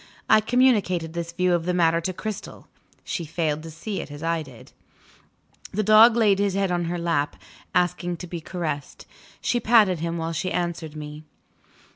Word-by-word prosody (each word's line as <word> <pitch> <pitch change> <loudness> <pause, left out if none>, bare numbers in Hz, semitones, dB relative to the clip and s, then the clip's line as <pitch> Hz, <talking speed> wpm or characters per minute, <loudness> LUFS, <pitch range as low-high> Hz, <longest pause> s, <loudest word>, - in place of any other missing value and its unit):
I 220 0 +6
communicated 210 -9 +2
this 170 0 -4
view 180 +1 +1
of 170 -1 0
the 180 - +1
matter 165 -1 +3
to 185 - -2
Cristel. 215 +2 -7 0.4
She 175 - -3
failed 155 -1 -2
to 165 - -9
see 180 +6 -5
it - - -9
as 145 +1 -9
I 165 0 0
did. 130 -6 -13 1.0
The 215 +2 -1
dog 215 +3 +7
laid 210 -4 +3
his 200 -2 +1
head 195 -2 +1
on 175 -1 0
her 175 +1 -2
lap, 165 -4 0 0.4
asking 175 -1 0
to 180 - -7
be 170 -1 -6
caressed. 155 -4 -5 0.4
She 240 - +1
patted 215 -6 +4
him 170 +1 -2
while 165 0 -3
she 165 +3 -2
answered 170 -3 -3
me. 150 0 -8
175 Hz, 180 wpm, -24 LUFS, 165-195 Hz, 1.0 s, dog